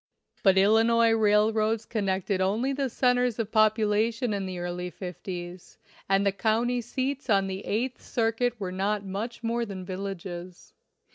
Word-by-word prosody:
But 195 -1 +4
Illinois 225 +3 +4
railroads 220 0 +2
connected 195 -3 -1
only 220 +8 +1
the 275 -1 -1
cen 250 +1 +2
ters 245 -2 0
of 225 -2 -3
population 215 +2 +2
in 195 -1 -2
the 185 -1 -5
early 175 0 -4
fifties, 180 -1 -8 0.3
and 195 +1 +3
the 200 - +3
county 230 +4 0
seats 260 +3 -3
on 195 -2 +4
the 190 +1 -5
Eighth 240 +5 -2
Circuit 230 +1 -1
were 190 -3 -3
not 200 +2 -1
much 220 +5 -5
more 235 +1 0
than 195 -4 -6
villages. 185 -2 -7
210 Hz, 150 wpm, -27 LUFS, 190-230 Hz, 0.3 s, But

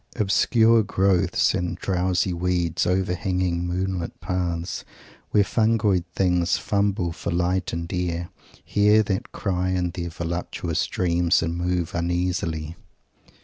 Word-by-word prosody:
Obscure 115 +1 +4
growths, 95 -3 +2
and 90 -2 -2
drowsy 90 -1 0
weeds 85 -1 0
overhanging 90 -1 0
moon 95 +1 -1
lit 85 - -6
paths, 85 -1 -3 0.5
where 105 - +4
fungoid 105 -3 +2
things 90 -2 +2
fumble 100 -4 0
for 85 - -5
light 90 +2 0
and 85 +2 -4
air, 85 -1 -2 0.4
hear 105 +1 +4
that 100 -2 -3
cry 95 -2 -1
in 90 -1 0
their 85 -1 -4
voluptuous 85 0 -3
dreams 85 -1 +1
and 85 +1 -2
move 90 -1 -1
uneasily. 85 -2 -1
90 Hz, 120 wpm, -24 LUFS, 85-95 Hz, 0.5 s, Obscure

